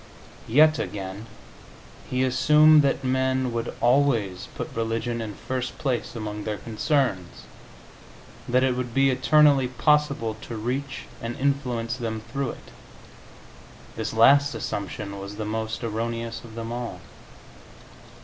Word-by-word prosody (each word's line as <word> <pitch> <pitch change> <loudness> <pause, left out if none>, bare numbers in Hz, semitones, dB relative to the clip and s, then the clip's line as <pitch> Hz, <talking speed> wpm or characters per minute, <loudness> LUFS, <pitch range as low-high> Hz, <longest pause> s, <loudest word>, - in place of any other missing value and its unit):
Yet 155 +6 +5
again, 100 +2 -5 0.8
He 130 0 +1
assumed 150 +4 +6
that 140 -1 0
men 130 -1 0
would 115 0 -2
always 120 -7 +2
put - - -5
religion 115 +1 -2
in 105 -3 -6
first 130 +3 -4
place 125 -3 -2
among 105 -2 -5
their 105 -1 -3
concerns 110 - -1 1.1
that 125 +1 +3
it 130 -1 +2
would 125 -1 -4
be 135 0 +4
eternally 135 +1 +4
possible 140 -4 +1
to 115 - -7
reach 130 +5 -3 0.2
and 115 +1 -4
influence 130 -4 -1
them 110 -3 -4
through 140 -2 -1
it. - - -10 1.2
This 110 -1 -3
last 140 +4 +5
assumption 100 -1 -5
was 100 +1 -7
the 110 0 -4
most 110 +2 -3
erroneous 115 +1 -3
of 115 -2 -12
them 115 0 -5
all. 120 -6 -5
120 Hz, 130 wpm, -25 LUFS, 110-135 Hz, 1.2 s, assumed